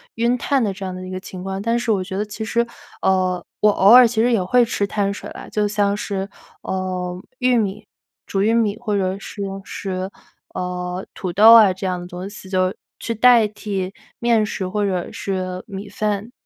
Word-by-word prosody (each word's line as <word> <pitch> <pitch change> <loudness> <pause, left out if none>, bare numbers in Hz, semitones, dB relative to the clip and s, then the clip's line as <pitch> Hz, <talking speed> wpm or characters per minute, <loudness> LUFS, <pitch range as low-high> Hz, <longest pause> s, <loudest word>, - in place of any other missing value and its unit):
晕 235 +2 +1
碳 270 0 +1
的 205 - 0
这 190 0 -7
样 185 -1 -4
的 185 - -7
一 - - -7
个 185 0 -4
情 185 -1 -9
况。 190 0 -4
但 230 +3 0
是 235 -2 0
我 190 -3 +1
觉 190 - -6
得 205 - 0
其 215 +1 -6
实 235 +1 +1 0.4
呃， 185 -2 +1 0.2
我 210 0 +6
偶 200 0 +4
尔 250 -1 +10
其 225 -1 0
实 245 +1 +3
也 205 -6 +2
会 245 +6 +4
吃 205 -3 -1
碳 200 0 -1
水 200 - -7
啦， - - -9
就 210 -1 +1
像 205 -1 +1
是， 195 -1 -3 0.3
呃， 185 -1 -3 0.2
玉 250 -1 +3
米， 210 -1 -1 0.4
煮 195 0 0
玉 225 +2 +3
米 220 -2 +1
或 215 -4 -2
者 190 0 0
是 200 +1 -8 0.2
是， 185 -1 -4 0.5
呃， 180 0 -4
土 180 -3 -4
豆 220 +4 +8
啊 210 -5 +7
这 190 +1 -4
样 180 -1 -1
的 175 - -8
东 180 +2 -7
西， 205 -2 -11
就 185 -1 +1 0.3
去 230 - -3
代 230 -1 +6
替 200 -2 -4 0.3
面 235 -2 +3
食 190 -2 -3
或 205 +2 -1
者 185 -3 -1
是 185 -1 -4
米 200 0 -7
饭。 210 +2 -2
200 Hz, 225 characters per minute, -21 LUFS, 185-220 Hz, 0.5 s, 尔